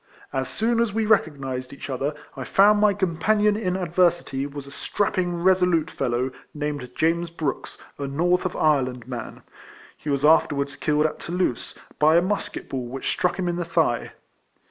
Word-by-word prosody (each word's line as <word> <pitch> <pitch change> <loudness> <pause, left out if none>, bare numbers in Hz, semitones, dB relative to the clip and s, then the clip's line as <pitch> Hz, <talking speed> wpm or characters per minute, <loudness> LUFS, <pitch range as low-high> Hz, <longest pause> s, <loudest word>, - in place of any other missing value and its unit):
As 130 0 -1
soon 230 +1 0
as 235 -2 +2
we 220 +2 0
re 215 -1 +6
cognised 135 -4 -6
each 140 - -8
other, 140 +2 -2 0.2
I - - -5
found 205 +2 +4
ray 205 -2 +4
companion 205 +3 +2
in 185 -4 -1
adversity 175 -6 +1
was 145 -1 -8
a 140 - -12
strapping 180 +2 -1
resolute 180 -4 +3
fellow 125 +2 -1 0.2
named 145 -4 -3
James 170 +1 +1
Brooks, 155 -4 -4 0.2
a 140 - -3
north 175 +6 +1
of 185 - -3
Ireland 130 -6 +1
man. 120 -3 -7 0.5
He 150 - -7
was 140 0 +1
afterwards 140 -3 +3
killed 150 +1 +1
at 155 - -2
Toulouse, 175 -8 -2 0.2
by 155 +2 +5
a 170 - +6
musket 205 +2 -3
ball 130 -2 -4
which 130 +2 -4
struck 180 - 0
him 185 -2 -1
in 175 0 -1
the 175 - -1
thigh. 165 -8 0
160 Hz, 175 wpm, -24 LUFS, 140-185 Hz, 0.5 s, re